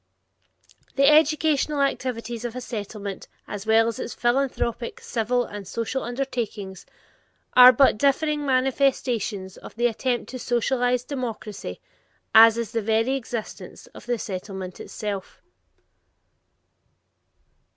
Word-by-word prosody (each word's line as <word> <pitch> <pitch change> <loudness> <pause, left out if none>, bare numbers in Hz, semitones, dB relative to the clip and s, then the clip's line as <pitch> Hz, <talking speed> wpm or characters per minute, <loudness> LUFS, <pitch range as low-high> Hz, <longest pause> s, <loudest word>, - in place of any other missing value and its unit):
The 275 0 +4
educational 300 -1 +3
activities 240 -4 -2
of 240 -1 -5
a - - -3
Settlement, 205 -4 -6 0.2
as 205 +1 -7
well 225 +1 +4
its 230 +1 -5
philanthropic, 240 -1 -1
civic, 240 +2 -1
and 205 -2 -7
social 230 +5 -3
undertakings, 235 -7 -4 0.7
are 250 0 +10
but 255 -3 +4
differing 295 +2 +1
manifestations 255 -7 0
of - - -12
the 240 +1 0
attempt 240 +1 -1
to 255 - -6
socialize 245 +1 0
democracy, 225 - -6 0.5
as 225 0 +8
is 235 -2 -3
the 230 -1 -1
very 225 +4 +1
existence 235 -4 -6
of - - -13
the 245 -1 0
Settlement 190 -2 -6
itself. 205 -3 -6
240 Hz, 110 wpm, -24 LUFS, 215-260 Hz, 0.7 s, are